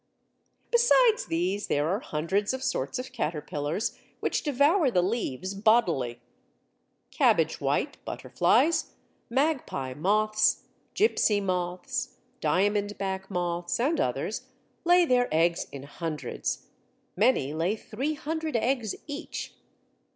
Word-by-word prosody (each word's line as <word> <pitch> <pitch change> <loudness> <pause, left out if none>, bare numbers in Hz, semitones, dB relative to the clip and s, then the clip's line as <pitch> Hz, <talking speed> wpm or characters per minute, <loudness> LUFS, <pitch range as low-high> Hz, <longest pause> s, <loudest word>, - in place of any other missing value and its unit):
Besides 475 -1 +4
these, 180 +5 -1
there 145 +1 +1
are 195 +5 0
hundreds 195 +7 -1
of 260 - -6
sorts 260 0 -1
of 255 +1 -6
caterpillars 150 - -2 0.2
which - - 0
devour 295 +2 +3
the 180 -7 +2
leaves 190 - -2
bodily. 175 - +2 0.9
Cabbage - - +2
white - - -1
butterflies, 300 +8 +1 0.3
magpie 260 - 0
moths, 215 +7 +2 0.3
gipsy 310 - +3
moths, 185 +7 -2 0.2
diamondback 200 -1 0
moths, 175 -1 -2
and 290 +7 +1
others, - - -2 0.4
lay 350 0 +6
their 250 -4 +3
eggs 170 +2 +2
in 140 -1 -8
hundreds. 155 +1 -4 0.5
Many 195 - +2
lay 170 +6 0
300 305 +7 -3
eggs 235 -2 0
each. 290 -1 -6
205 Hz, 105 wpm, -28 LUFS, 175-265 Hz, 0.9 s, lay